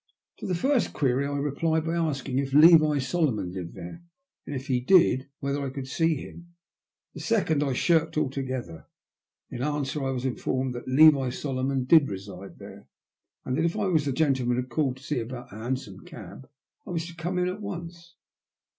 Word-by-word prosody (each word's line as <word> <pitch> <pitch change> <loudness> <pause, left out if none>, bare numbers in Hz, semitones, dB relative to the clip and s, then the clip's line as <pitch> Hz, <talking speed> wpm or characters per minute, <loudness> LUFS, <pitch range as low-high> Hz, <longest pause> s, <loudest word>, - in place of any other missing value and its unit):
To - - -6
the 180 - 0
j&rst 265 +7 +1
query 135 0 +1
I 145 0 -2
replied 155 +3 0
by 165 - -1
asking 140 -6 -1
if 135 0 -2
Levi 155 -1 +7
Solo 155 +2 +1
mon 105 -5 -4
lived 90 -2 -7
there, 90 - -9 0.5
and, 145 - -4
if 130 0 -5
he 130 -3 +1
did, 135 -2 +4
whether 140 0 -2
I 135 - -2
could 135 0 -6
see 160 +3 +1
him. 170 +4 -10 0.6
The - - -9
second 190 -10 +1
I 140 -3 0
shirked 165 +3 +1
altogether. 130 - -3 0.6
In 120 - -5
answer 145 0 -2
I 135 - -1
was 130 -1 -3
informed 130 0 -2
that 120 - -8
Levi 140 -1 +6
Solomon 130 0 -2
did 145 +2 +5
reside 95 0 -8
there, - - -12 0.6
and 130 - -1
that 160 - +1
if 170 +5 0
I 210 - 0
was 160 -6 +1
the 140 - 0
gentleman 130 -4 +1
who 125 - 0
had 130 - -16
called 130 -1 0
to 130 - -17
see 145 -2 -2
him 115 - -4
about 125 0 -8
a - - -8
hansom 115 -4 -4
cab 130 - -11 0.4
I - - -8
was 165 -2 -2
to 170 -1 -10
come 175 +2 -3
in 180 0 +1
at 185 +3 -4
once. 170 -3 -8
140 Hz, 200 wpm, -26 LUFS, 130-165 Hz, 0.6 s, Levi